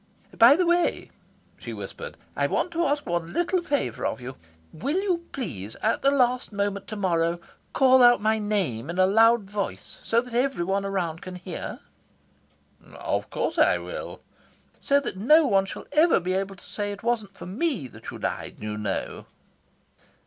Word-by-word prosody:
"By 235 +5 +8
the 360 +2 +2
way," 345 0 +1 0.5
she - - -7
whispered, - - -8 0.2
"I - - +1
want 360 - -1
to 335 -1 +1
ask 290 +1 -1
one 170 -1 -2
little 350 +1 +1
favour 290 -5 -2
of - - -1
you. 130 +1 -7 0.4
Will 285 - -1
you, 360 -4 -1
please, 110 - -5
at 225 - +1
the 275 - +4
last 250 -3 +1
moment 200 -1 -2
to 215 - -6
morrow, 170 -4 0 0.3
call 260 -1 +5
out 240 0 +7
my 220 +1 +1
name 185 - -1
in 170 - -4
a 185 - +5
loud 225 +3 +5
voice, 200 0 -5
so 230 - +2
that 250 0 -6
every 245 -7 +1
one 195 +2 0
around 180 -5 -2
can 185 0 -8
hear?" 180 - -6 1.1
"Of - - -2
course - - -2
I - - +5
will." - - -7 0.6
"So 280 0 +3
that 275 -9 -5
no 300 +10 +5
one 195 -6 +3
shall 195 - -8
ever 310 - +4
be 185 +1 -2
able 195 +1 -2
to - - -18
say 205 -1 -4
it 205 +1 -8
wasn't 220 -4 -1
for - - -8
me 215 - -2
that - - -10
you - - -7
died, - - -4
you 105 0 -4
know." 105 - -4
210 Hz, 180 wpm, -25 LUFS, 185-275 Hz, 1.1 s, By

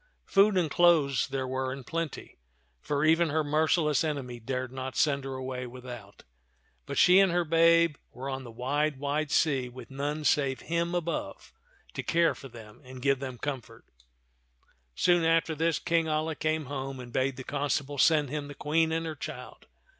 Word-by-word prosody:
Food 200 0 +4
and 165 -5 +1
clothes 160 -6 +4
there 135 -1 -3
were 130 0 -2
in 135 0 -7
plenty, 165 - -5 0.4
for 145 +1 0
even 165 +1 +4
her 155 +2 +1
merciless 155 0 +2
enemy 135 -6 -3
dared 130 +2 -4
not 130 0 -6
send 140 -2 +1
her 135 -1 -4
away 130 -1 -5
without; 120 -5 -10 0.6
but - - -4
she 180 +1 +7
and 195 -2 +4
her 175 0 +2
babe 165 -1 +4
were 130 +2 -7
on 135 -1 -4
the 120 - -10
wide, 140 +5 -1
wide 145 +2 -1
sea 135 -6 +1
with 125 +2 -11
none 145 +3 -3
save 135 -2 +1
Him 170 +2 -1
above 170 -1 -4 0.4
to - - -3
care 170 0 +2
for 135 - -11
them 115 -2 -13
and 130 0 -10
give 135 +1 +1
them 130 -2 -6
comfort. 120 -5 -6 1.1
Soon 175 - +3
after 165 0 +2
this. 160 0 +1
King 165 -2 0
Alia 155 +1 0
came 155 0 -1
home 135 -1 -5
and 120 -1 -10
bade 130 0 0
the 130 - -6
constable 145 0 -2
send 155 -4 +4
him 150 -1 -3
the 145 - -9
Queen 160 +2 +1
and 165 0 -1
her 160 - -3
child. - - -9
145 Hz, 180 wpm, -29 LUFS, 130-160 Hz, 1.1 s, she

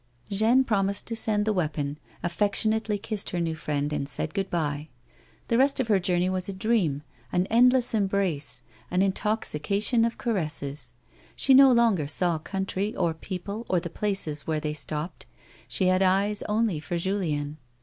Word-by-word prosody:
Jeanne 225 +6 +4
pr(niiised 200 -3 0
to 230 - -4
send 210 -2 +1
the 215 - +1
weapon, 150 -5 -2 0.2
aft'ectionately 210 +4 +1
kissed 210 0 -3
her 180 - -2
new 165 -1 -1
friend 150 -1 -2
and 140 -1 -2
said 155 - -3
good 195 -1 -2
bye. 150 -3 -2 0.6
The 230 - +2
rest 275 +1 +3
of 250 -4 -1
her 205 -3 +4
journey 180 0 +1
was 185 0 -2
a - - -3
dream, 190 -8 0 0.3
an 180 +1 +1
endless 250 +1 +4
embrace, 190 - 0 0.3
an 180 +2 +2
intoxication 205 +2 0
of 230 0 -1
caresses; 150 - -3 0.4
she 270 - +3
no 270 0 +8
longer 230 - +3
saw 170 +1 +1
country 195 +4 -3
or 165 - +1
people 195 +6 -6
or 180 - +3
the 170 -1 -7
places 180 -8 -2
where 155 -1 0
they 150 0 -3
stopped, 155 +2 -3 0.4
she 125 +10 0
had 185 +1 +3
eyes 195 +2 +2
only 210 -6 +1
for 155 +3 -3
Julien. 155 -5 -2
190 Hz, 165 wpm, -26 LUFS, 155-215 Hz, 0.6 s, no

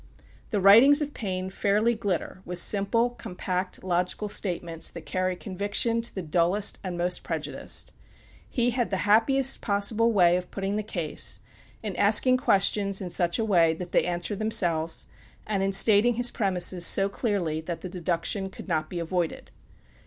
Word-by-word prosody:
The 210 - -1
writings 230 +10 +7
of 290 0 -7
Paine 185 -3 -4
fairly 210 +4 +1
glitter 195 -4 -4
with 180 -1 -6
simple, 210 +6 +2
compact, 185 -4 -5
logical 180 +3 -1
statements, 170 -5 -3
that 170 - -10
carry 185 0 -2
conviction 205 +5 -1
to 235 - -5
the 190 - -4
dullest 175 +5 +1
and 180 -2 -5
most 180 +1 0
prejudiced. - - -3 0.6
He 245 0 0
had 240 0 -1
the 190 -1 -2
happiest 260 +6 +3
possible 215 +2 +1
way 180 -4 +4
of 180 0 -6
putting 195 +1 -3
the 215 - -1
case; 175 -7 -3 0.4
in 205 -4 -4
asking 220 +5 +4
questions 200 -5 +1
in 180 -2 -5
such 175 -1 +1
a 225 - -1
way 170 -6 +3
that 175 +1 -8
they - - +2
answer 175 +3 -2
themselves, 175 -7 0 0.4
and 205 -2 -1
in 195 0 0
stating 215 +4 +4
his 245 +1 +2
premises 185 -4 +1
so 195 +3 +4
clearly 195 -7 -2
that 165 0 -6
the - - -6
deduction 180 +2 -2
could 190 - -11
not 155 -3 -1
be 180 - -6
avoided. 170 0 -3
195 Hz, 165 wpm, -26 LUFS, 175-215 Hz, 0.6 s, writings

